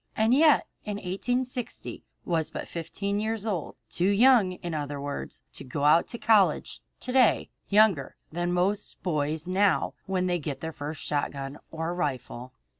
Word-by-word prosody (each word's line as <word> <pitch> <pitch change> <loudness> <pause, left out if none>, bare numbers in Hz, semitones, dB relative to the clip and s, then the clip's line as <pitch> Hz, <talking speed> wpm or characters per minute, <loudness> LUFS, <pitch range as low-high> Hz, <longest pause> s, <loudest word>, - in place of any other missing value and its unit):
And 220 +2 +3
yet 300 +2 +5 0.2
in 210 -1 -4
1860 245 +6 -3
he - - -12 0.2
was 165 -3 0
but - - -6
fifteen 200 +4 -3
years 220 0 -2
old, 190 -8 -3 0.2
too 180 +3 +1
young, 215 -2 +5
in 175 -2 -6
other 145 -2 -3
words, 140 0 -6
to - - -7
go 145 +5 +3
to 235 - -5
college 215 -4 +3 0.2
to 255 - -3
day, 255 -2 +3 0.2
younger 200 -9 +4 0.2
than 175 +2 -1
most 190 +4 -1
boys 155 -2 -1
now 190 +2 +2
when 185 -1 0
they 175 -1 0
get 140 -3 -4
their 160 0 -5
first 150 +1 -6
shotgun 140 -1 -3
or 165 +1 -3
rifle. 130 -6 -3
180 Hz, 160 wpm, -27 LUFS, 150-210 Hz, 0.2 s, yet